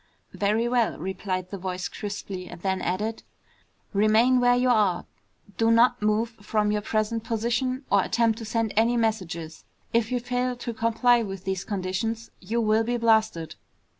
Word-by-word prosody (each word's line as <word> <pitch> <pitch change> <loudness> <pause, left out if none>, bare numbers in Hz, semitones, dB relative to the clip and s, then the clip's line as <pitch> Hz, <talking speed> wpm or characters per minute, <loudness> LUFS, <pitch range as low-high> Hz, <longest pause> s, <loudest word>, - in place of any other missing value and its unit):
"Very 215 +3 +1
well," 240 -2 +1
replied 185 +1 -4
the 200 - -5
voice 185 -1 -3
crisply, 200 -2 -6
and 175 - -10
then 190 -1 0
added, 210 +5 -2 0.7
"Remain 220 +5 +4
where 245 0 +4
you 250 +1 +2
are. 205 -6 +2 0.5
Do 225 0 +3
not 240 +1 +4
move 215 +2 +1
from 210 0 0
your 210 0 0
present 215 +1 -1
position 240 +4 -1
or 200 - +5
attempt 230 -1 +1
to 225 - -6
send 225 0 -1
any 230 +3 +3
messages. 180 -8 -2 0.3
If 230 0 +1
you 250 - +1
fail 250 +1 -1
to 240 -1 -5
comply 230 +2 +3
with 195 -4 -5
these 190 -1 -2
conditions 205 +4 -3
you 220 +5 -2
will 220 0 +3
be 240 +2 -1
blasted!" 220 -9 +2
220 Hz, 165 wpm, -26 LUFS, 195-235 Hz, 0.7 s, or